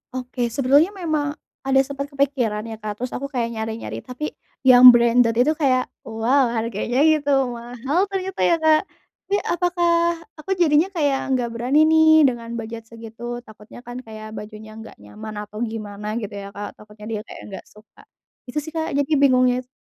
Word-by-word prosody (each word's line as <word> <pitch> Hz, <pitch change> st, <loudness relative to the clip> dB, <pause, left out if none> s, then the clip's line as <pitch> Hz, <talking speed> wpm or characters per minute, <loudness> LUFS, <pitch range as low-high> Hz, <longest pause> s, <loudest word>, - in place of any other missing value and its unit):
Oke 250 Hz, -1 st, -3 dB
sebetulnya 280 Hz, -, +3 dB
memang 305 Hz, -5 st, -2 dB, 0.3 s
ada 270 Hz, 0 st, +4 dB
sempet 280 Hz, +1 st, -5 dB
kepikiran 270 Hz, -7 st, -1 dB
ya 225 Hz, -1 st, -8 dB
Kak, 210 Hz, -1 st, -5 dB
terus 250 Hz, -, -3 dB
aku 280 Hz, -, -4 dB
kayak 245 Hz, -4 st, -2 dB
nyari-nyari 225 Hz, 0 st, -5 dB
tapi 260 Hz, +4 st, -6 dB, 0.3 s
yang 255 Hz, -1 st, +9 dB
branded 235 Hz, -1 st, +6 dB
itu 250 Hz, +6 st, +3 dB
kayak 270 Hz, -5 st, +1 dB, 0.2 s
wow 235 Hz, +4 st, +2 dB
harganya 230 Hz, +4 st, 0 dB
gitu 305 Hz, -2 st, +3 dB, 0.2 s
mahal 245 Hz, -, -2 dB
ternyata 380 Hz, -1 st, -4 dB
ya 340 Hz, -, +4 dB
Kak, 315 Hz, -1 st, +3 dB, 0.5 s
tapi 400 Hz, -, +1 dB
apakah 350 Hz, 0 st, +1 dB, 0.5 s
aku 345 Hz, +6 st, -6 dB
jadinya 325 Hz, 0 st, +3 dB
kayak 285 Hz, -4 st, 0 dB
nggak 245 Hz, -2 st, -1 dB
berani 250 Hz, +6 st, +2 dB
nih 315 Hz, -1 st, +6 dB
dengan 235 Hz, -3 st, 0 dB
budget 225 Hz, 0 st, -7 dB
segitu 230 Hz, +2 st, -8 dB
takutnya 220 Hz, +2 st, -14 dB
kan 245 Hz, +1 st, -7 dB
kayak 215 Hz, -2 st, -10 dB
bajunya 215 Hz, 0 st, -9 dB
enggak 225 Hz, -, -11 dB
nyaman 215 Hz, 0 st, -9 dB
atau 210 Hz, +1 st, -10 dB
gimana 215 Hz, -3 st, -5 dB
gitu 215 Hz, -4 st, -4 dB
ya 200 Hz, -, -8 dB
Kak, 205 Hz, 0 st, -7 dB
takutnya 210 Hz, 0 st, -14 dB
dia 215 Hz, -, -3 dB
kayak -, -, -10 dB
nggak 195 Hz, -, -8 dB
suka, 215 Hz, +1 st, -21 dB, 0.5 s
gitu 245 Hz, +4 st, -7 dB
sih 315 Hz, -, -8 dB
Kak, 320 Hz, -3 st, -3 dB
jadi 285 Hz, +2 st, 0 dB
bingungnya 255 Hz, -2 st, +4 dB
itu 255 Hz, -, -11 dB
250 Hz, 175 wpm, -22 LUFS, 225-290 Hz, 0.5 s, yang